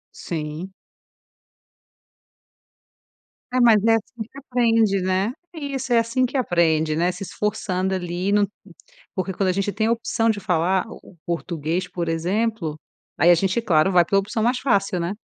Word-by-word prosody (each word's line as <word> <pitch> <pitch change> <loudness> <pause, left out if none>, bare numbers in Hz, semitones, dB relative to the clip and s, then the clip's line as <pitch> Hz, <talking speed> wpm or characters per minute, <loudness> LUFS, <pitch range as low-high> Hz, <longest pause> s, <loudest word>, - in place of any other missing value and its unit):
Sim. 160 +3 -5 2.8
É, 255 - +3
mas 225 -3 +5
é 225 0 +5
assim 220 - -6
que 215 - -11
se 275 - -13
aprende, 230 -6 +2
né. 190 +4 0 0.2
Isso, 275 -5 -4
é 235 - +5
assim 230 +3 +1
que 260 +3 -2
aprende, 160 -8 +2
né. 175 +2 +1
Se 180 - -8
esforçando 190 -2 -2
ali 180 +1 -2
no 205 -1 +3 0.7
porque 190 0 -2
quando 195 0 0
a - - +2
gente 195 +2 -1
tem 220 - 0
a - - +3
opção 230 0 0
de 210 -2 -2
falar 180 +1 +1
o - - -13
o - - -22 0.2
português 165 +3 -3
por 170 -2 -4
exemplo, 175 -1 -1 0.4
aí 170 +3 +5
a 175 - +8
gente 190 +6 +1
claro 175 -4 +2
vai 175 -1 +5
pra 195 - +2
opção 210 +3 -2
mais 245 +3 +2
fácil, 200 -7 +1
né? 170 +3 -2
195 Hz, 170 wpm, -22 LUFS, 175-225 Hz, 2.8 s, a